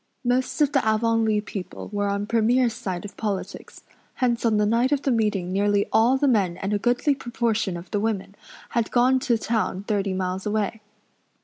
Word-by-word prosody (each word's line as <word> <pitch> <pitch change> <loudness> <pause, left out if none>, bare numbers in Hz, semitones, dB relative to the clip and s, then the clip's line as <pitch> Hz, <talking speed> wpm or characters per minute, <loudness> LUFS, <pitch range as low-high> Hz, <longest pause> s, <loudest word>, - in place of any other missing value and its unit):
Most 250 +4 0
of 290 -1 +4
the 275 - +2
Avonlea 220 -1 +2
people 195 -2 -7
were 205 0 0
on 200 0 -1
Premier's 235 +2 +2
side 195 -6 -5
of 205 - -9
politics; 205 -3 -5 0.3
hence 240 -2 0
on 225 -3 +2
the 210 - +3
night 235 +5 +2
of 285 -1 +1
the 270 - +1
meeting 210 -6 0
nearly 205 +1 +2
all 240 +4 +4
the 285 +1 +1
men 195 -8 +2
and 195 +2 -3
a 205 - +1
goodly 245 +6 +2
proportion 225 -7 -1
of 170 +1 -11
the 205 - 0
women 205 -2 -2 0.4
had 235 -2 -1
gone 255 +2 +3
to 255 -4 +1
town 220 -4 -1
thirty 200 -2 -1
miles 185 +1 -3
away. 215 +1 -1
220 Hz, 190 wpm, -24 LUFS, 200-240 Hz, 0.4 s, of